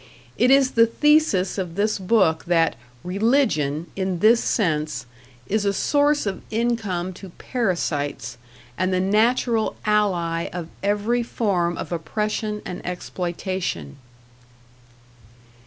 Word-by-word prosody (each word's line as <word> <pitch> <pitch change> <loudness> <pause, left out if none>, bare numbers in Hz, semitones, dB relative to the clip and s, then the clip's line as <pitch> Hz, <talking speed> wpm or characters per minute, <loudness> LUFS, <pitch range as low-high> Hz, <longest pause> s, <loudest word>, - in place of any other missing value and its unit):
It 250 - +3
is 270 -1 +5
the 230 0 +5
thesis 265 -8 +2
of 175 -3 -4
this 210 +1 0
book 185 -5 +2
that 165 -4 +2 0.3
"Religion" 180 - +1
in 190 -2 -1
this 225 +6 +4
sense 155 - 0 0.4
is 210 +6 0
a 200 -1 +1
source 290 +5 +2
of 195 -2 -3
income 215 -6 -1
to 190 +1 -11
parasites, 145 - -2 0.4
and 185 0 +1
the 185 - +1
natural 220 +3 +2
ally 180 -6 +1
of 170 -2 -6
every 210 +4 +1
form 185 -7 -1
of - - -6
oppression 210 +5 -2
and 180 - -6
exploitation. 180 - -4
195 Hz, 115 wpm, -23 LUFS, 175-225 Hz, 0.4 s, is